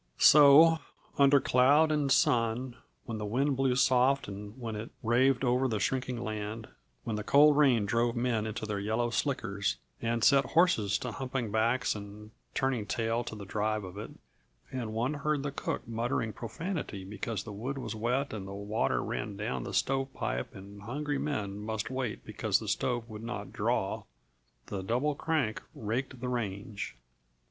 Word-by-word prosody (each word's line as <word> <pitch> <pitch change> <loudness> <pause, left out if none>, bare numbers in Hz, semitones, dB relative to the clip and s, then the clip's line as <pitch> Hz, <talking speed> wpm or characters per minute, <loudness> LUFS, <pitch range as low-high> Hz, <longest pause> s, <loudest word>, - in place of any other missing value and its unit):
So, 150 +3 +8 0.4
under 140 0 +6
cloud 140 +6 +4
and 145 -3 +1
sun, 120 0 +2 0.3
when 115 -3 -4
the - - -4
wind 135 +6 +1
blew 130 -1 +2
soft 130 +1 +3
and 105 +3 -8
when 115 -3 -4
it 105 +2 -5
raved 125 +4 +3
over 125 +1 +2
the 110 -4 -1
shrinking 125 +3 -1
land, 110 0 -4 0.4
when 110 - -2
the 105 - -3
cold 145 +6 +6
rain 130 -8 +4
drove 115 +3 +1
men 120 -3 0
into 110 0 -4
their 105 -2 -2
yellow 110 +4 0
slickers 100 - -1 0.2
and 115 0 -1
set 140 +1 +6
horses 125 - +3
to 125 -3 -5
humping 125 -2 -3
backs 115 +4 +2
and 105 +1 -9 0.2
turning 130 -6 0
tail 115 -1 0
to 110 - -6
the 100 -1 -8
drive 105 +1 -1
of 90 0 -8
it - - -6 0.6
and 120 -4 -4
one 120 +6 0
heard 145 -1 -1
the 145 - -2
cook 140 - -4
muttering 115 -1 -1
profanity 125 - -5
because 105 +1 -4
the 105 - -8
wood 125 +7 -4
was 120 -5 -4
wet 120 +5 -1
and 100 -3 -5
the 100 - -7
water 100 +2 -1
ran - - -4
down 65 -1 -3
the - - -5
stovepipe 135 - -1
and 100 +1 -11
hungry 145 +6 -3
men 105 -9 -3
must 110 +2 -3
wait 130 -5 -3
because - - 0
the - - -7
stove 120 -2 -1
would 110 -2 -8
not 120 +2 -6
"draw," - - 0 0.6
the 100 - -4
Double 125 +9 0
Crank 145 -7 -1
raked 120 +4 -3
the 125 - -2
range. 105 -2 -4
120 Hz, 170 wpm, -30 LUFS, 105-135 Hz, 0.6 s, So